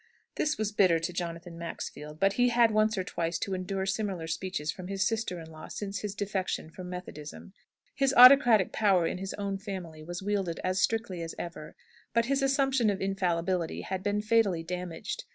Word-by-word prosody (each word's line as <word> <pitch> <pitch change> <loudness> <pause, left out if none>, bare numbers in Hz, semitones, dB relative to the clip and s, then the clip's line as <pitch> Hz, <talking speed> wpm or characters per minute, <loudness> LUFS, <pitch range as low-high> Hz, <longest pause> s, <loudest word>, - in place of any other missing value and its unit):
This 305 - 0
was 215 -1 -1
bitter 185 -5 +4
to 165 +2 -3
Jonathan 170 -1 -5
Maxfield. 150 -2 -7
But 195 +2 +3
he 245 +3 +3
had 240 0 +1
had 230 -1 +6
once 215 0 +2
or 185 - 0
twice 170 -1 -2
to 195 - -3
endure 190 +1 -2
similar 195 -3 -2
speeches 160 -2 -3
from 180 +2 -9
his 195 0 0
sister 220 -6 -2
in 160 -1 -10
law, 155 0 -10
since 200 -1 -5
his 210 -1 -4
defection 195 -5 -2
from 180 +1 -8
Methodism. 180 -1 -8 0.4
His 275 -1 +2
autocratic 245 -5 +8
power 195 -5 +3
in 180 - -2
his 195 0 -5
own 200 -1 -3
family 185 -6 -7
was 175 +4 -6
wielded 195 -4 -1
as 185 +1 0
strictly 225 -6 0
as 165 -1 -5
ever, 170 -3 -7 0.4
but 230 0 +4
his 275 +2 +1
assumption 270 -4 +2
of 200 -1 -1
infallibility 180 -3 -1
had 190 -1 -4
been 205 +1 -1
fatally 215 -7 +2
damaged. 180 -1 -5
190 Hz, 190 wpm, -29 LUFS, 170-215 Hz, 0.4 s, autocratic